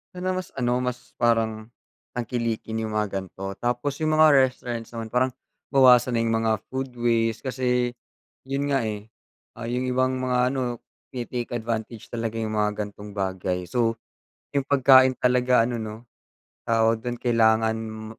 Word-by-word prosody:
Dun 180 - -6
na 185 - +1
mas 185 -2 -5
ano, 125 -1 +1
mas 125 -1 -4
parang 110 -2 +1 0.5
tangkilikin 115 -2 -2
yung 110 -1 -3
mga 105 -2 0
gan'to. 95 +1 -7
Tapos 125 +4 -1
yung 155 0 +1
mga 155 0 +7 0.2
restaurants 120 -2 -6
naman 115 -1 -5
parang 130 +1 +2 0.4
bawasan 125 -2 +5
na 115 - +2
yung 115 - 0
mga 110 -2 +1
food 130 -1 -4
waste. 115 -2 +1
Kasi 125 -2 0 0.5
yun 135 +1 -2
nga, 140 -2 +1
eh, 105 -2 -4 0.5
ah, 115 0 -6
yung 125 +1 -1
ibang 130 +1 +1
mga 125 -1 +1
ano, 125 -3 -3 0.3
tine-take 120 -1 -4
advantage 115 -1 -4
talaga 115 -1 -3
yung 110 -1 -2
mga 105 0 0
gantong 105 0 -9
bagay. 95 -2 -2
So, 115 -2 +1 0.6
yung 140 -1 -1
pagkain 130 -2 +6
talaga 125 -1 +3
ano, 120 -1 -2
no? 110 -1 -5 0.7
Tawag 115 0 +3
dun 120 +1 -4
kailangan 110 -2 +3
m 110 0 -7
120 Hz, 160 wpm, -25 LUFS, 110-125 Hz, 0.7 s, mga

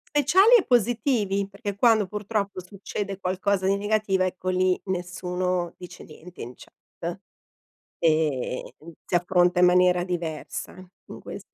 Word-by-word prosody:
Speciali 380 - +5
e 375 - -1
positivi, 225 -5 +1
perché 200 0 -6
quando 220 -1 +3
purtroppo 200 -1 -3
succede 200 +1 -6
qualcosa 190 +1 -1
di 195 +1 +2
negativo, 205 -2 0
ecco 185 0 -3
lì 185 0 +2
nessuno 180 -1 -2
dice 180 -1 -11
niente 170 +3 -12
in 120 +2 -7
chat - - -9 0.8
e, 155 -6 0
ehm, 165 +2 -13
si - - -5
affronta 180 0 +3
in 180 - +7
maniera 180 0 +4
diversa 170 -4 -5 0.4
in - - -9
queste - - -9
185 Hz, 135 wpm, -25 LUFS, 180-205 Hz, 0.8 s, in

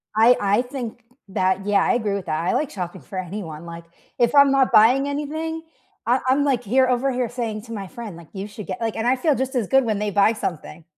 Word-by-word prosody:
I 230 +3 +6
I 205 +3 +2
think 245 -2 -7 0.3
that 190 0 0
yeah, 205 -1 +3
I - - +2
agree 220 -4 0
with 195 - -5
that. 155 -1 -1
I 180 - 0
like 300 - 0
shopping 180 -3 -6
for 190 - -9
anyone, 170 -4 -6
like, 170 0 -8 0.3
if 240 +2 +2
I'm 280 -1 +6
not 270 -1 +3
buying 250 +6 +5
anything, 315 +3 -3 0.4
I 245 +3 +3
I'm, 270 +3 +3
like, 265 -4 +1
here 260 +5 +3
over 255 +2 +1
here 250 -2 -1
saying 225 -3 -4
to 230 0 -9
my 200 -3 -5
friend, 215 -4 -8
like, 170 -2 -14
"You 195 +1 -5
should 210 0 -10
get" - - -5
like, 225 -1 -2
and 225 +1 -1
I 255 - +4
feel 295 +2 +1
just 265 +1 -3
as 235 -6 0
good 270 -1 +3
when 215 -3 -1
they 210 0 -1
buy 200 +3 +4
something. 170 -5 -5
230 Hz, 245 wpm, -22 LUFS, 200-260 Hz, 0.4 s, I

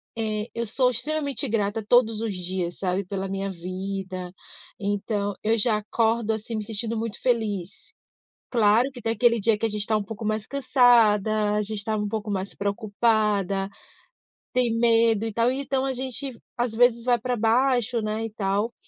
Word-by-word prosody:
eh, 215 -1 -2
eu 235 -1 -2
sou 250 +3 +2
extremamente 280 -1 -2
grata 210 0 0
todos 225 -1 +3
os 225 -2 -1
dias, 180 -1 -3
sabe, 190 +1 -1
pela 195 +1 -4
minha 195 +1 -3
vida. 185 0 -5 0.5
Então 205 0 -1
eu 225 +2 +2
já 220 0 +2
acordo, 225 +1 0
assim, 220 +1 -5
me 215 - -2
sentindo 225 +2 -3
muito 225 -1 -4
feliz. 210 - -2 0.6
Claro 235 +3 +3
que 245 - -10
tem 225 - +1
aquele 235 -1 +3
dia 215 +1 +2
que 225 - 0
a - - 0
gente 210 -1 -3
está 215 +2 +1
um 210 - -1
pouco 220 +1 -7
mais 215 0 -1
cansada. 220 -6 +3
A 210 - +1
gente 210 0 -4
estava 215 +1 -2
um 210 - -2
pouco 215 0 -3
mais 195 0 -3
preocupada, 205 -2 0 0.8
tem 250 -3 +2
medo 230 -2 +3
e 225 - -2
tal. 230 +3 +2
E 265 +2 -2
então 270 -1 -1
a 270 - -1
gente 260 0 -5 0.2
às 240 -2 -1
vezes 235 0 +3
vai 245 -1 +4
para 245 +2 -2
baixo, 240 +1 +2
né, 215 +1 -2
e - - -4
tal. 205 +2 -1
220 Hz, 180 wpm, -25 LUFS, 205-235 Hz, 0.8 s, vai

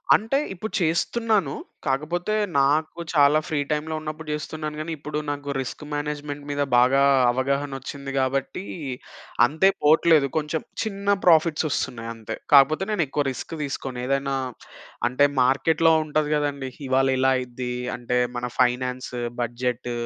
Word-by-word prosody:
అంటే 225 +6 0 0.2
ఇప్పుడు 215 +4 -6
చేస్తున్నాను. 190 +1 +1 0.3
కాకపోతే 155 +8 -1 0.2
నాకు 155 +4 +2
చాలా 145 0 +5
ఫ్రీ 155 -3 -1
టైమ్‌లో 155 +1 -1
ఉన్నప్పుడు 155 +1 -6
చేస్తున్నాను 150 0 -5
గానీ 155 +2 -4
ఇప్పుడు 150 +1 -5
నాకు 145 0 -4
రిస్క్ 130 +3 -5
మేనేజ్మెంట్ 145 -1 -4
మీద 145 0 -1 0.2
బాగా 130 +3 +5 0.3
అవగాహనొచ్చింది 135 +1 -3
గాబట్టి 135 +7 -1 0.8
అంతే 160 +9 +3
పోవట్లేదు. 155 -1 +5
కొంచేం 155 +1 -2 0.2
చిన్న 200 -2 0
ప్రాఫిట్స్ 165 -2 +4
ఒస్తున్నాయి 115 -4 -3
అంతే. 110 0 -6 0.2
కాపోతే 145 +5 +6
నేను 210 -6 +1
ఎక్కువ 145 +2 -1
రిస్క్ 130 - -7
దీసుకోను. 135 -3 -4
ఏదైనా 135 +1 0 0.7
అంటే 130 +3 +4 0.2
మార్కెట్‌లో 160 +5 +3
ఉంటది 150 0 0
గదండీ. 140 -2 -2 0.2
ఇవాళ 130 +1 +3
ఇలా 130 +1 +3
అయిద్ది 125 0 -4 0.2
అంటే 125 0 -2 0.2
మన 120 - -3
ఫైనాన్స్, 125 0 0 0.3
బడ్జెట్, 120 +1 -2
145 Hz, 130 wpm, -24 LUFS, 130-155 Hz, 0.8 s, కాపోతే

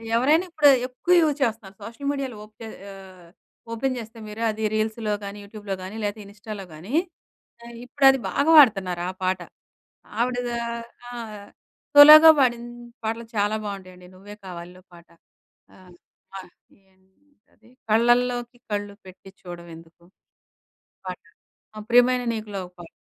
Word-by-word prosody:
ఎవరైనా 300 +9 +3
ఇప్పుడు 300 -3 +4 0.2
ఎక్కువ 265 +8 -1
యూజ్ 300 -2 +1
చేస్తున్నారు. 220 -4 -3
సోషల్ 235 +6 -8
మీడియాలో 270 -5 -5
ఓకే 220 +1 -12 0.3
ఆహ్, 185 -3 -15 0.4
ఓపెన్ 255 +3 -2
చేస్తే 225 0 -11
మీరు 215 +2 -6
అది 220 +1 -6
రీల్స్‌లో 215 0 -2
గానీ, 200 +1 -7
యూట్యూబ్‌లో 205 -1 -6
గానీ 195 +4 -8
లేతే 205 +1 -3
ఇనిస్టాలో 205 0 -9
గానీ, 180 - -10 0.7
ఆహ్, 235 0 -11
ఇప్పుడది 270 +1 +4
బాగా 285 - +1
వాడతన్నారా 190 -9 +3
ఆ - - -29
పాట. 185 0 0 0.8
ఆవిడ 245 +1 0 0.3
ఆహ్, 235 0 -6 0.3
ఆ! 240 - -8 0.8
సోలోగా 305 +2 +11
పాడిన 240 -3 +2 0.4
పాటలు 225 +1 -3
చాలా 205 +1 +1
బావుంటాయండి. 185 -3 -9
'నువ్వే 205 +2 -12
కావాలిలో' 180 +1 -10
పాట. 170 0 -17 0.7
ఆహ్, 185 -1 -18 0.4
ఆహ్, 185 -2 -11 0.4
ఏంటది, 195 +5 -30 0.2
'కళ్ళలోకి 240 +2 +1
కళ్ళు 205 0 -3
పెట్టి 190 +1 -14
చూడవెందుకు' 170 -1 -12 1.0
పాట 180 - -6 0.6
ఆహ్, 215 0 -9
'ప్రియమైన 245 +1 +4
నీకు‌లో' 210 -3 -6
ఒక 180 - -24
పాట. 165 - -12
215 Hz, 130 wpm, -23 LUFS, 190-245 Hz, 1.0 s, సోలోగా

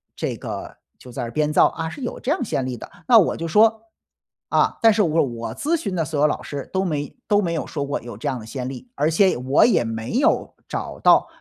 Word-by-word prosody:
这 - - -3
个 - - -7 0.2
就 125 - -13
在 - - -5
这 120 - -3
儿 - - -8
编 150 +3 0
造： - - +6
“啊， 160 0 -2
是 275 - -9
有 245 - -4
这 275 - -2
样 335 - 0
先 135 - -2
例 130 - -3
的”。 115 - -10 0.2
那 240 -3 +8
我 185 - +1
就 165 - -4
说： 220 +5 +4 0.7
“啊， - - +2
但 225 -1 +7
是 210 -1 +3
我 165 -1 +2
我 120 -4 -5
咨 330 +3 0
询 250 - -4
的 170 -3 0
所 155 -2 -3
有 150 - +4
老 - - -2
师 140 -2 -6
都 190 0 +1
没 150 -5 -3
都 205 -1 +4
没 170 -4 -1
有 160 - -3
说 145 -2 -3
过 140 - -3
有 120 -3 -9
这 110 - -5
样 130 -3 -1
的 110 - -11
先 125 +1 -5
例， 135 - -8
而 155 +2 +1
且 190 +4 +3
我 130 +3 +3
也 220 - +3
没 115 +1 -4
有 265 - +1
找 - - -5
到 - - +5
155 Hz, 280 characters per minute, -22 LUFS, 130-210 Hz, 0.7 s, 那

